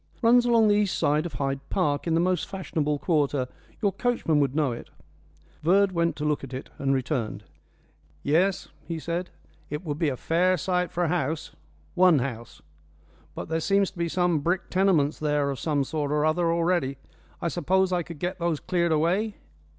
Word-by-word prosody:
"Runs 240 +1 +5
along 230 -2 +5
the 205 - +5
east 205 -3 +1
side 150 +3 +1
of 165 - -11
Hyde 135 +1 -2
Park, 150 -5 0
in 165 - +2
the - - +3
most 180 -1 +1
fashionable 155 -6 -2
quarter. 145 -5 +1 0.4
Your 200 - +3
coachman 210 -9 0
would 140 -1 +1
know 150 -4 +2
it." 120 - -7 0.7
Verd 190 +5 +4
went 170 -1 0
to 150 - -4
look 150 -2 0
at 135 -1 -6
it, 130 - -8
and 135 -1 +1
returned. 130 -4 -1 0.8
"Yes," 180 +6 +1 0.2
he 165 - -3
said, 170 +3 -3 0.4
"it 150 +5 -5
would 150 -1 -3
be 160 - +2
a 130 - -3
fair 180 +6 +2
site 180 +1 -1
for 175 - -1
a - - +1
house 160 -2 -1 0.4
one 180 -3 +5
house. 120 -7 -5 0.7
But - - -5
there 160 0 0
seems 195 +3 +2
to - - -20
be 170 0 0
some 175 -2 +1
brick 175 +5 -1
tenements 180 -6 +2
there 150 -2 +1
of 135 - -5
some 145 -3 0
sort 145 +1 -2
or 150 0 +2
other 165 +2 +2
already. 170 -5 +1 0.4
I 170 - -2
suppose 185 +3 +1
I 175 - +1
could 170 -1 -8
get 180 +5 -3
those 170 -3 0
cleared 175 -2 0
away?" 180 +7 +1
165 Hz, 190 wpm, -26 LUFS, 145-180 Hz, 0.8 s, Runs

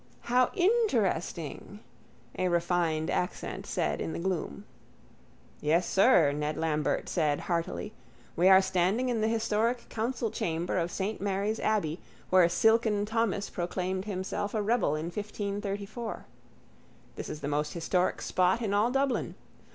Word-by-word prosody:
—How 250 +1 +3
interesting! 225 - 0 0.6
a 185 - 0
refined 170 -2 +1
accent 180 - -3
said - - -1
in 160 - -3
the - - -4
gloom. 170 - -3 1.0
—Yes, 165 +4 +2
sir, 190 - +5
Ned 150 +1 -2
Lambert 155 -2 0
said 150 -4 0
heartily. 170 -2 -2 0.4
We 180 +3 +5
are 190 0 +7
standing 190 +8 +1
in 230 -3 0
the 220 - +2
historic 225 +1 0
council 230 0 -2
chamber 170 +2 -1
of 170 0 -1
saint 195 +4 -3
Mary's 200 +2 -1
abbey 190 -7 0 0.3
where 185 -2 +6
silken 220 0 +3
Thomas 220 -2 -1
proclaimed 185 +2 -2
himself 200 +1 -3
a 215 - +1
rebel 220 -8 +1
in 155 +1 -3
1534. 205 +2 -4 0.9
This - - -6
is 155 - -6
the 140 - -3
most 150 +1 -1
historic 180 +2 0
spot 185 +4 +2
in 205 -2 -1
all 210 +3 +3
Dublin. 270 0 0
190 Hz, 135 wpm, -29 LUFS, 170-220 Hz, 1.0 s, are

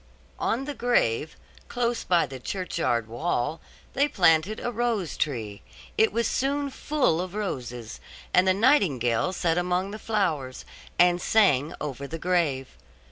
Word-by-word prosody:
On 255 +4 -1
the 290 - -4
grave, 160 - +1 0.3
close 240 -1 -1
by 175 -2 +3
the 135 -2 -9
churchyard 160 - -2
wall, 125 +4 -2 0.3
they 280 +2 +3
planted 180 - +3
a 240 - -3
rose 230 -7 -1
tree; 110 -9 -3 0.3
it 220 - +3
was 235 +2 0
soon 280 +1 -1
full 270 - 0
of 185 +1 -6
roses, 125 - -5 0.3
and 180 +1 +5
the 185 - +5
nightingale 185 - +2
sat 175 -2 0
among 180 +2 -1
the 215 - -7
flowers, 165 -14 -2 0.3
and 175 0 +4
sang 160 -11 +3
over 140 -1 -5
the 165 - -5
grave. 160 -7 0
180 Hz, 140 wpm, -26 LUFS, 140-220 Hz, 0.3 s, and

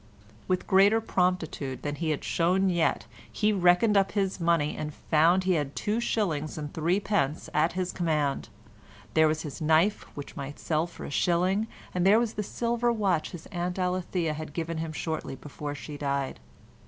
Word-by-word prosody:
With 185 -1 0
greater 200 +3 +5
promptitude 180 - -1
than 145 - -2
he 160 +2 -2
had 150 - -1
shown 185 +3 +2
yet, 170 -2 +1 0.3
he 215 -1 +1
reckoned 180 +3 +4
up 195 -1 +3
his 195 -2 0
money 165 -3 +1
and 150 0 -4
found 170 +4 +3
he 185 - +1
had 145 -4 -1
two 210 +2 -1
shillings 165 -11 -1
and 150 -1 -5
threepence 170 -2 0
at 155 +3 +2
his 185 0 -2
command; 155 -5 -1 0.6
there 160 0 +5
was 155 +1 -1
his 150 -1 -7
knife 160 +6 +2
which 145 - -7
might 140 +1 -6
sell 160 +1 0
for 170 - -10
a - - -7
shilling, 185 +7 +1 0.3
and 180 - 0
there 200 +3 +6
was 230 -1 0
the 210 - -2
silver 235 +3 0
watch 200 -8 0
his 170 -3 -9
Aunt 180 -1 -2
Alethea 180 -3 -1
had 155 -1 -7
given 165 0 -3
him 160 0 -3
shortly 160 -3 -4
before 145 +1 -6
she 145 0 -8
died. 140 - -2
170 Hz, 180 wpm, -28 LUFS, 155-190 Hz, 0.6 s, there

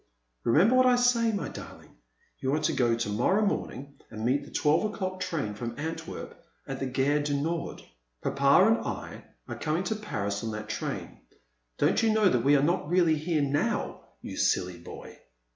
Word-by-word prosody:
Remember 180 - +4
what 255 0 +5
I 250 - +5
say, 245 -2 +3
my 205 - -2
darling; - - -11 0.4
you 135 +2 0
are - - +1
to 160 - +1
go 120 -4 +2
to 115 -3 -2
morrow 185 - +2
morning 140 - -3
and 110 +1 -5
meet 135 +4 +2
the - - -12
twelve 150 +4 +2
o'clock 190 -3 -3
train 165 - -2
from 115 +2 -6
Antwerp 160 +3 -6 0.2
at 135 0 -5
the 135 - -2
Gare 135 +3 +1
du 145 -1 -1
Nord. 165 +3 -3 0.4
Papa 140 +6 +4
and 225 +1 +4
I - - -6 0.2
are - - -6
coming 160 +3 -1
to 220 - -1
Paris 100 - -3
on 115 - -2
that 110 0 -6
train. - - -4 0.6
Don't - - +2
you 225 -1 +3
know 215 -2 +4
that 125 -8 +1
we 140 +2 +5
are 140 - +3
not 170 -1 0
really 175 -2 +4
here 155 0 0
now, 140 +1 -1 0.2
you - - -7
silly 90 -1 +1
boy 85 - -11
150 Hz, 190 wpm, -28 LUFS, 125-185 Hz, 0.6 s, what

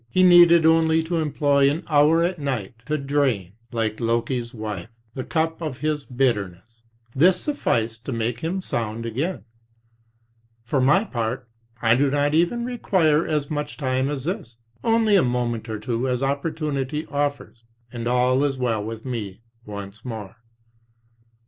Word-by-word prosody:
He 185 +9 +3
needed 175 -2 +7
only 160 0 +4
to 170 +1 -2
employ 145 -3 +2
an 150 +4 -2
hour 155 +2 +4
at 175 0 -1
night 130 -9 -3
to 155 0 0
drain, 135 - 0 0.2
like 110 -2 -2
Loki's 120 +1 -1
wife, 110 -5 -6 0.2
the 130 - -4
cup 160 +3 -1
of 150 -6 -4
his 150 0 -2
bitterness; 115 -4 -2 0.3
this 180 +6 +5
sufficed 115 - -1
to - - -3
make 115 0 -2
him 180 +6 -3
sound 115 -3 -3
again. 140 +11 -3 1.2
For 130 +3 0
my 150 +10 +4
part, 125 - -3 0.4
I 115 0 +5
do 135 +3 +3
not 145 +1 +1
even 175 +9 +2
require 175 -10 +1
as 150 -2 -1
much 150 -1 -3
time 130 -1 0
as 145 -3 -3
this. 170 - -5 0.3
Only 225 -2 +3
a 190 - +6
moment 120 -2 -1
or 110 - -3
two 115 +4 -2
as 125 +1 -1
opportunity 150 0 -2
offers, 145 -5 -3 0.3
and 120 -1 -4
all 125 +2 +2
is 140 -2 0
well 115 -4 -1
with 110 +2 -7
me 110 -5 -5 0.3
once 100 +1 -8
more. 110 -4 -7
135 Hz, 155 wpm, -23 LUFS, 115-155 Hz, 1.2 s, needed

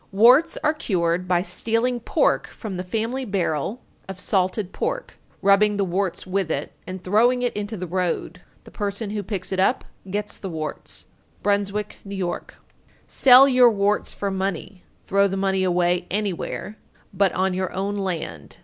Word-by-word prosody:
Warts 250 +11 +5
are 305 - +3
cured 180 - -1
by 180 -1 +2
stealing 230 +4 0
pork 235 - +1
from 215 -5 -7
the 180 - -3
family 225 +7 -2
barrel 195 - -2 0.3
of 190 -1 -7
salted 190 +1 0
pork, - - -3 0.2
rubbing 205 +1 +4
the 200 - +1
warts 185 0 -2
with 185 -2 -1
it, 145 -2 -2 0.2
and 185 0 -6
throwing 240 +6 +3
it 245 - -1
into 210 +1 -4
the 180 - -4
road. 180 0 -2 0.2
The - - -14
person 205 0 -3
who 210 -1 -2
picks 195 -2 -5
it 190 - -1
up 220 +7 +2 0.2
gets 205 +2 -3
the 195 - -6
warts. 155 -2 -5 0.4
Bruynswick, 205 0 -1
N.Y. 200 -1 -6
902. 175 - -5 0.5
Sell 265 +1 +7
your 250 -2 +6
warts 205 -1 0
for 200 -1 -2
money, 190 -1 -4 0.2
throw 200 +1 +3
the 195 0 -3
money 190 -1 +1
away 180 -1 +1
anywhere, 205 +1 -3 0.3
but 195 -1 +3
on 190 0 +1
your 185 0 -2
own 200 +2 -2
land. 165 - -4
195 Hz, 165 wpm, -23 LUFS, 185-210 Hz, 0.5 s, Sell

